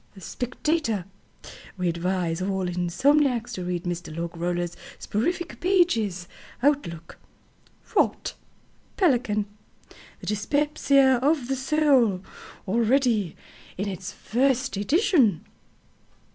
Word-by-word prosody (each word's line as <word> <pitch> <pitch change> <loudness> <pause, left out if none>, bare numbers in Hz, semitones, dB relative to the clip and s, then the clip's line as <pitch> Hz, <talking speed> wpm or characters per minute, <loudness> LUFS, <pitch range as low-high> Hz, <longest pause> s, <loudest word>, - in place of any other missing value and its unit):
Spectator 245 - -2 0.7
"We 180 -1 -1
advise 170 0 -1
all 190 0 -1
insomniacs 235 - +2
to 185 - -4
read 175 -1 -3
Mr. 175 -2 -4
Logroller's 170 +1 -3 0.2
soporific 330 - -2
pages." 230 - +1 0.4
Outlook 170 - -1 0.8
"Rot." - - +1 0.6
Pelican 245 - +2 0.8
THE - - -9
DYSPEPSIA 275 +3 +2
OF 285 -2 +2
THE 270 - 0
SOUL 265 -8 +2 0.4
Already 230 - +2 0.4
in 200 +3 -2
its 185 -1 -5
first 260 +4 0
edition. 250 - +2
220 Hz, 90 wpm, -25 LUFS, 180-275 Hz, 0.8 s, insomniacs